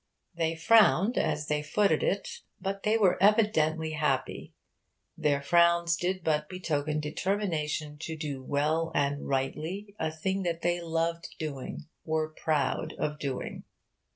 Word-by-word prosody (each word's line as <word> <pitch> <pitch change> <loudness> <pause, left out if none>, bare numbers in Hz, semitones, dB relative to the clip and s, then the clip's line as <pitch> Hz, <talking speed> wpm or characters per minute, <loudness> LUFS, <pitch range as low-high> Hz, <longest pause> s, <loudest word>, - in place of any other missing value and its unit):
They 165 -1 -1
frowned 210 +4 +5
as 150 - 0
they 150 0 0
footed 160 +2 +2
it, 195 +1 0 0.3
but 195 0 -3
they 215 +2 +2
were 190 -5 +3
evidently 160 -7 +3
happy. 145 -4 -2 0.6
Their 145 -2 +1
frowns 170 +1 +4
did 180 +1 -2
but 150 -1 0
betoken 155 -4 -1
determination 155 -2 -2
to 160 0 -5
do 145 -4 -4
well 155 +4 0
and 145 0 0
rightly 160 +9 -2
a 160 - 0
thing 190 +5 -2
that 170 -2 -2
they 175 0 +1
loved 165 0 -2
doing 145 -3 -5 0.2
were 155 -1 -1
proud 155 0 -1
of 150 0 -2
doing. 135 -3 -4
160 Hz, 135 wpm, -29 LUFS, 150-180 Hz, 0.6 s, frowned